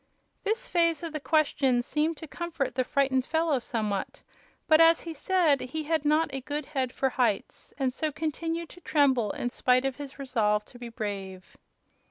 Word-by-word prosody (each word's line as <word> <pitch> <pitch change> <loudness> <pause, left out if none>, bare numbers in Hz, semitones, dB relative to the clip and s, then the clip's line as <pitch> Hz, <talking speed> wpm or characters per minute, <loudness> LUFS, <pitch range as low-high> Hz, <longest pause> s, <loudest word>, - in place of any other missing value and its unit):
This 435 +2 -1
phase 335 -2 +2
of 330 -2 -5
the 305 - -2
question 280 -5 +2
seemed 310 +4 0
to 320 - -9
comfort 325 -3 -3
the 255 +1 +1
frightened 265 -1 +1
fellow 320 -1 +1
somewhat; 215 -4 -3 0.4
but, 315 0 +6
as 330 0 +6
he 330 - -6
said, 320 -3 +2
he 310 +5 -4
had 310 -1 0
not 305 0 +2
a 270 - -3
good 290 +2 -4
head 265 -4 -2
for 265 - 0
heights, 235 -6 -1
and 265 -3 0
so 310 +3 -2
continued 325 +2 -3
to 355 - -14
tremble 265 -9 +2
in 245 +4 -3
spite 255 +1 +2
of 270 -2 -2
his 285 -2 -8
resolve 215 -6 0
to 245 - -15
be 240 -1 -7
brave. 200 -5 -6
280 Hz, 185 wpm, -28 LUFS, 250-320 Hz, 0.4 s, but